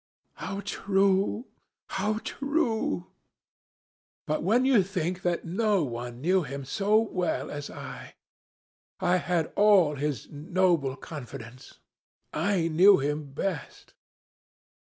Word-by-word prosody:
'How 195 Hz, +1 st, -5 dB
true! 195 Hz, +2 st, +1 dB, 0.4 s
how 215 Hz, 0 st, -1 dB
true! 245 Hz, -, -1 dB, 1.1 s
But 155 Hz, -, -1 dB
when 230 Hz, +9 st, +3 dB
you 260 Hz, -6 st, +5 dB
think 180 Hz, -1 st, -2 dB
that 175 Hz, -1 st, -1 dB
no 200 Hz, +1 st, +1 dB
one 120 Hz, -1 st, -5 dB
knew 185 Hz, +5 st, +3 dB
him 140 Hz, -2 st, -6 dB
so 205 Hz, +9 st, +2 dB
well 180 Hz, -, -2 dB
as 145 Hz, 0 st, -5 dB
I! -, -, -9 dB, 0.8 s
I 180 Hz, +1 st, +3 dB
had 175 Hz, -3 st, -1 dB
all 200 Hz, -7 st, +5 dB
his 145 Hz, -1 st, -2 dB
noble 165 Hz, -3 st, +1 dB
confidence. 125 Hz, -5 st, -10 dB, 0.6 s
I 170 Hz, +1 st, +1 dB
knew 185 Hz, +5 st, +6 dB
him 145 Hz, 0 st, -2 dB
best.' 195 Hz, +7 st, -4 dB
180 Hz, 110 wpm, -28 LUFS, 145-200 Hz, 1.1 s, knew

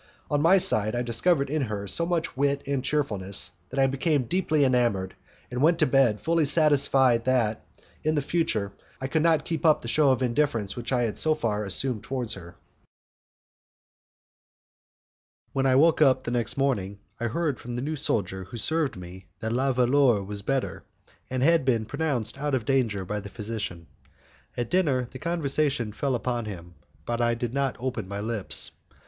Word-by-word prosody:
On 145 Hz, 0 st, +2 dB
my 170 Hz, +5 st, +6 dB
side, 110 Hz, -, +2 dB
I 120 Hz, -, 0 dB
discovered 140 Hz, +6 st, +1 dB
in 155 Hz, 0 st, 0 dB
her 105 Hz, -5 st, -3 dB
so 170 Hz, -, +1 dB
much 170 Hz, -4 st, -1 dB
wit 140 Hz, +1 st, 0 dB
and 140 Hz, -2 st, -1 dB
cheerfulness, 105 Hz, -11 st, -1 dB, 0.2 s
that 135 Hz, -, -8 dB
I 135 Hz, -, +5 dB
became 135 Hz, +1 st, +1 dB
deeply 155 Hz, 0 st, +1 dB
enamoured, 120 Hz, -8 st, +1 dB, 0.4 s
and 125 Hz, +1 st, -3 dB
went 165 Hz, +3 st, +4 dB
to 160 Hz, -, +4 dB
bed 130 Hz, -6 st, +3 dB
fully 165 Hz, -1 st, +1 dB
satisfied 135 Hz, -6 st, +3 dB
that, 120 Hz, -4 st, +1 dB, 0.4 s
in 155 Hz, +1 st, +1 dB
the 145 Hz, -, 0 dB
future, 110 Hz, -12 st, -1 dB, 0.3 s
I 130 Hz, -, -4 dB
could 155 Hz, +4 st, 0 dB
not 165 Hz, -1 st, +2 dB
keep 165 Hz, -2 st, -3 dB
up 155 Hz, -2 st, +4 dB
the -, -, -6 dB
show 145 Hz, +4 st, +3 dB
of 130 Hz, 0 st, 0 dB
indifference 120 Hz, -5 st, 0 dB
which 120 Hz, 0 st, -5 dB
I 125 Hz, -2 st, +2 dB
had 110 Hz, -3 st, -2 dB
so 155 Hz, -1 st, +2 dB
far 105 Hz, -8 st, -1 dB
assumed 110 Hz, +4 st, 0 dB
towards 125 Hz, -4 st, -3 dB
her. 85 Hz, -3 st, -11 dB, 3.0 s
When 135 Hz, 0 st, +1 dB
I 130 Hz, -, +4 dB
woke 160 Hz, +3 st, +4 dB
up 130 Hz, -3 st, +4 dB
the 120 Hz, -, -4 dB
next 120 Hz, 0 st, -2 dB
morning, 105 Hz, -8 st, 0 dB, 0.2 s
I 120 Hz, -, -1 dB
heard 145 Hz, +1 st, -1 dB
from 120 Hz, 0 st, -7 dB
the 120 Hz, -, -3 dB
new 155 Hz, +2 st, -2 dB
soldier 95 Hz, -8 st, -2 dB
who 120 Hz, -, -9 dB
served 155 Hz, -, 0 dB
me 90 Hz, +1 st, -11 dB
that 110 Hz, +1 st, -3 dB
La 135 Hz, +2 st, +1 dB
Valeur 125 Hz, -3 st, +3 dB
was 100 Hz, +1 st, -6 dB
better, 135 Hz, +5 st, -2 dB, 0.5 s
and 130 Hz, 0 st, -1 dB
had 165 Hz, 0 st, +4 dB
been 120 Hz, -4 st, +1 dB
pronounced 135 Hz, -2 st, -2 dB
out 145 Hz, -1 st, 0 dB
of 120 Hz, -4 st, -2 dB
danger 115 Hz, -8 st, 0 dB
by 105 Hz, +3 st, -3 dB
the 100 Hz, 0 st, -9 dB
physician. 105 Hz, -5 st, -5 dB, 0.7 s
At 120 Hz, -2 st, -3 dB
dinner 145 Hz, -9 st, +2 dB
the 130 Hz, +2 st, -11 dB
conversation 145 Hz, -7 st, 0 dB
fell 135 Hz, +3 st, -1 dB
upon 120 Hz, -1 st, -2 dB
him, 90 Hz, -4 st, -8 dB, 0.3 s
but 120 Hz, 0 st, -2 dB
I 120 Hz, 0 st, +2 dB
did 120 Hz, 0 st, -4 dB
not 140 Hz, -1 st, 0 dB
open 125 Hz, -5 st, -3 dB
my 100 Hz, +1 st, -5 dB
lips. 110 Hz, -1 st, +1 dB
130 Hz, 185 wpm, -26 LUFS, 110-145 Hz, 3.0 s, my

